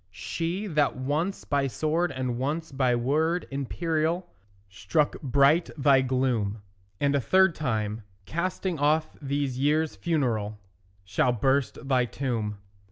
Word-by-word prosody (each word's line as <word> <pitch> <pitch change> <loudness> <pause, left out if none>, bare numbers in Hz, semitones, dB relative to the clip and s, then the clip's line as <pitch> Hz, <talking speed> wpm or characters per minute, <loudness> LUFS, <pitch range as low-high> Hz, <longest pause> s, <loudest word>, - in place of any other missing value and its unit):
She 165 - -3
that 150 -7 +1
once 150 +9 -2
by 140 -1 +1
sword 155 +5 0
and 130 -3 -3
once 155 +5 -2
by 130 -3 +2
word 155 +8 +1
imperial 160 +5 -1 0.4
Struck 95 +10 0
bright 140 +5 +3
thy 135 -2 +5
gloom; 125 -6 0 0.4
And 140 0 +2
a 140 - +2
third 190 +6 +4
time, 110 -7 -2 0.2
casting 175 - -2
off 155 +2 +1
these 140 -2 -2
years 150 +3 +1
funereal, 115 -10 -1 0.5
Shall 125 +6 +1
burst 135 +3 0
thy 130 -2 +3
tomb. 115 -5 -3
140 Hz, 125 wpm, -27 LUFS, 125-160 Hz, 0.5 s, thy